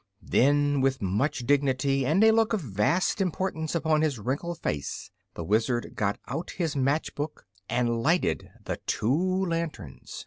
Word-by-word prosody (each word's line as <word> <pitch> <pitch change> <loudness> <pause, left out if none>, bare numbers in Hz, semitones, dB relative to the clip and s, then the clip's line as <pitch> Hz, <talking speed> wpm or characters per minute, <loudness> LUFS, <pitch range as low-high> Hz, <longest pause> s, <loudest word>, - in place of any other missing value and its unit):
] 100 - -47
Then, 145 +1 +3
with 135 0 +1
much 110 +6 -1
dignity 135 -1 +2
and 175 +9 +4
a 220 - +7
look 225 0 +2
of 215 - 0
vast 135 - +1
importance 175 -3 -2
upon 160 -2 +2
his 150 -5 +1
wrinkled 140 +10 -3
face, 70 - -4 0.2
the 85 - -4
Wizard 115 +6 0
got 100 0 -1
out 165 - -4
his 165 -5 -2
match 140 +3 0
box 145 +2 -5 0.3
and 120 -1 +1
lighted 155 - +1 0.2
the - - -3
two 185 - +1
lanterns. 165 - -5
145 Hz, 160 wpm, -27 LUFS, 120-165 Hz, 0.3 s, a